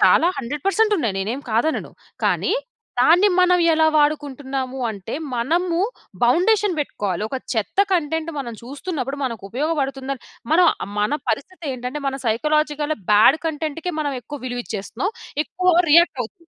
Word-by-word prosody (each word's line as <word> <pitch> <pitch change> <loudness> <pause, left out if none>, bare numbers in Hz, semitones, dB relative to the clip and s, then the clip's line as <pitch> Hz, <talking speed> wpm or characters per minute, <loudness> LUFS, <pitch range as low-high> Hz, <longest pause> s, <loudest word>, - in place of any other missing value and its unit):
చాలా - - +5
100% 390 - +1
ఉన్నాయి. 230 - -1
నేనేమి 235 +9 -3
కాదనను. 240 +9 0 0.3
కానీ - - +1 0.5
దాన్ని 345 +10 +6
మనం 360 0 +5
ఎలా 315 0 +3
వాడుకుంటున్నాము 275 -3 -1
అంటే 205 -1 -6 0.2
మనము 335 +8 0 0.5
బౌండేషన్ 380 - +3
పెట్టుకోవాలి. 205 -9 -2
ఒక 265 - -3 0.2
చెత్త 220 - -3
కంటెంట్ 320 -1 0
మనం 245 -4 -4
చూస్తున్నప్పుడు 280 +1 -4
మనకు 230 -5 -4
ఉపయోగపడుతుందని 275 -1 -2 0.3
మనం 350 +2 +6 0.3
మన 210 +1 +1 0.2
పరిస్థితి 370 +3 -3
ఏంటంటే 255 +4 -5
మన 270 0 -1
సైకాలజికల్‌‌గా 300 +5 0
బ్యాడ్ 225 +8 +6
కంటెంట్‌‌కే 320 +2 -3
మనం 290 -2 -1
ఎక్కువ 290 +5 -8
విలువిచ్చేస్తున్నాం. 245 - -3 0.3
ఎక్కువ 365 0 +1 0.2
రియాక్ట్ 335 -3 +5
అవుతునాం. 335 - -11
290 Hz, 125 wpm, -21 LUFS, 250-330 Hz, 0.5 s, దాన్ని